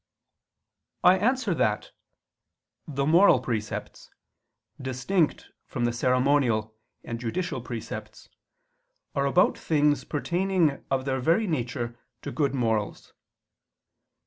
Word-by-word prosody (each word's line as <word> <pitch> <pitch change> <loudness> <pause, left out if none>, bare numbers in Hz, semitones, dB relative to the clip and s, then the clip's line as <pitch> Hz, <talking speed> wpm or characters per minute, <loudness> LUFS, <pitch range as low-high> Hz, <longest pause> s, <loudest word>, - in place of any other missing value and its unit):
I 185 +1 +6
answer 230 -2 +1
that, 105 -9 0 1.0
The 140 -2 -1
moral 165 -1 +6
precepts, 115 -4 -5 0.7
distinct 135 +7 -1 0.2
from 120 - -2
the 120 - 0
ceremonial 125 -3 +2 0.3
and 115 0 -5
judicial 130 +5 -3
precepts, 120 -1 -7 0.9
are 140 -1 +1
about 180 +6 +3
things 150 -2 +2
pertaining 170 -1 0
of 130 -1 0
their 130 -1 0
very 165 - +2
nature 120 - -3 0.2
to - - -4
good 140 -3 0
morals. 110 -4 -1
135 Hz, 100 wpm, -26 LUFS, 120-165 Hz, 1.0 s, I